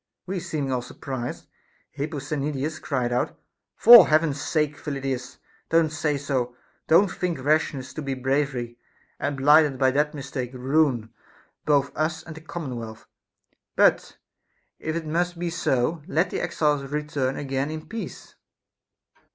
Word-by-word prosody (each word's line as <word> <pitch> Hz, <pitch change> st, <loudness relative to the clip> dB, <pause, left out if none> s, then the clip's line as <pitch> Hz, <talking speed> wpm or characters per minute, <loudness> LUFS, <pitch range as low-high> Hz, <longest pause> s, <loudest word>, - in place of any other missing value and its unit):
We 190 Hz, 0 st, -3 dB
seeming 145 Hz, -5 st, -3 dB
all 125 Hz, -1 st, 0 dB
surprised, 125 Hz, 0 st, -6 dB, 0.5 s
Hip 145 Hz, +2 st, -4 dB
posthenides 145 Hz, +1 st, -3 dB
cried 125 Hz, -4 st, -1 dB
out: 125 Hz, -, -1 dB, 0.4 s
For 235 Hz, -5 st, +10 dB
Heaven's 155 Hz, -2 st, +2 dB
sake, 150 Hz, 0 st, 0 dB
Phyllidas, 135 Hz, -4 st, -4 dB, 0.3 s
don't 165 Hz, -1 st, +3 dB
say 150 Hz, -1 st, -1 dB
so, 130 Hz, -3 st, -2 dB, 0.3 s
don't 175 Hz, +4 st, +5 dB
think 180 Hz, -2 st, -2 dB
rashness 145 Hz, -3 st, 0 dB
to 155 Hz, -, -5 dB
be 135 Hz, -2 st, -3 dB
bravery, 130 Hz, -2 st, -1 dB, 0.4 s
and 140 Hz, +1 st, -2 dB
blinded 145 Hz, 0 st, +5 dB
by 130 Hz, 0 st, +3 dB
that 150 Hz, +3 st, 0 dB
mistake 135 Hz, -3 st, -5 dB
ruin 130 Hz, -4 st, +1 dB, 0.5 s
both 140 Hz, -2 st, +2 dB
us 160 Hz, +1 st, -1 dB
and 160 Hz, -, -9 dB
the 160 Hz, -, -10 dB
commonwealth; 125 Hz, -9 st, -7 dB, 0.7 s
but, -, -, +3 dB, 0.6 s
if 160 Hz, 0 st, -3 dB
it 165 Hz, -1 st, -3 dB
must 175 Hz, +3 st, -1 dB
be 175 Hz, 0 st, -2 dB
so, 155 Hz, -1 st, 0 dB
let 180 Hz, 0 st, +1 dB
the -, -, -2 dB
exiles 150 Hz, -2 st, +1 dB
return 145 Hz, -2 st, -2 dB
again 135 Hz, 0 st, -2 dB
in 155 Hz, 0 st, -6 dB
peace. 225 Hz, 0 st, -7 dB
145 Hz, 140 wpm, -25 LUFS, 135-160 Hz, 0.7 s, For